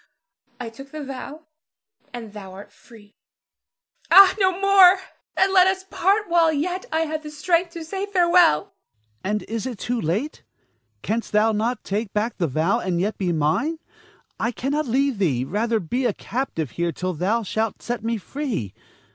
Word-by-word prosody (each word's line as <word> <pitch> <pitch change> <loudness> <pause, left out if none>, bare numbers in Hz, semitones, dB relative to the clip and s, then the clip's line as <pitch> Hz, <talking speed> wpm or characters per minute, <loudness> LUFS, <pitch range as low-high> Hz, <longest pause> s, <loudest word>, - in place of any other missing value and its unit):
I 240 -2 -5
took 270 +5 -12
the 305 +1 -7
vow, 275 +3 -8 0.7
and 230 -4 -8
thou 195 -3 -9
art 195 +2 -11
free. 215 -4 -18 1.0
Ah, 390 -1 +9
no 375 -1 +2
more! 390 -1 +7 0.4
and 385 0 +3
let 370 -1 +6
us 380 0 0
part 400 +3 +1
while 335 -2 +4
yet 355 +5 -2
I 320 +1 +1
have 310 -1 -2
the 305 - -8
strength 335 +3 0
to 335 -2 -7
say 385 +4 -4
farewell. 350 - +4
Ernest. - - -21 0.5
And 210 +1 -1
is 230 +2 -4
it - - -2
yet - - -13
too 240 +4 -2
late? 200 - -2 0.6
Canst 225 +2 -2
thou 215 +1 +4
not 225 +3 -1
take 205 +1 -3
back 215 +3 -1
the 170 - +1
vow, 155 +7 +1
and 180 -2 -2
yet 205 +4 -2
be 185 -3 0
mine? 165 - 0 0.6
I 230 +2 0
cannot 280 +5 -2
leave 265 -1 +1
thee, 135 -10 +1
rather 220 - 0
be 245 +8 -1
a 220 - -1
captive 210 - -4
here 170 0 -1
till 185 +4 -3
thou 200 +8 0
shalt 220 +2 -3
set 240 -2 -4
me 230 0 -1
free. 215 - -4
240 Hz, 180 wpm, -23 LUFS, 205-320 Hz, 1.0 s, Ah